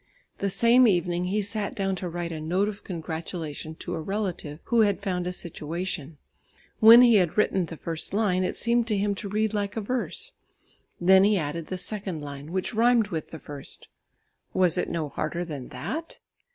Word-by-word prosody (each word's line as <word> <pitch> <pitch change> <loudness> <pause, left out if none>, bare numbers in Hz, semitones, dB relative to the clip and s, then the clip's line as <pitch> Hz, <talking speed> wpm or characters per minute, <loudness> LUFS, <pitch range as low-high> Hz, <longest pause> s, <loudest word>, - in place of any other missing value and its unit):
The 200 - 0
same 235 +5 +5
evening 175 -2 +1
he 205 +3 0
sat 205 0 -2
down 195 -3 0
to 180 -1 -4
write 170 0 -4
a 155 -1 -5
note 180 +6 +1
of 210 -1 -6
congratulation 160 -2 -5
to - - -6
a 160 - -3
relative 185 -5 -3
who 235 -1 +3
had 205 -2 +2
found 180 -3 -1
a - - -1
situation. 170 -2 -4 0.6
When 230 +2 +10
he 235 -3 +6
had 180 -2 +1
written 190 -4 +2
the 165 - -8
first 165 0 -4
line, 195 -3 +1
it 180 - -1
seemed 235 0 +1
to 215 -3 +1
him 200 +1 +1
to 200 0 -6
read 215 +1 0
like 205 0 -2
a - - 0
verse. 255 - -2 0.7
Then 190 +2 +6
he 205 0 +4
added 155 0 -3
the 185 - -4
second 195 -3 -4
line 145 +2 -8
which 185 +5 -2
rhymed 230 -1 +3
with 160 -5 -4
the 160 - -8
first. 145 -2 -8 0.7
Was 180 -3 +4
it 180 - -1
no 165 -3 -2
harder 155 +4 -3
than 145 -6 -6
that? 325 +2 -5
185 Hz, 190 wpm, -26 LUFS, 165-210 Hz, 0.7 s, When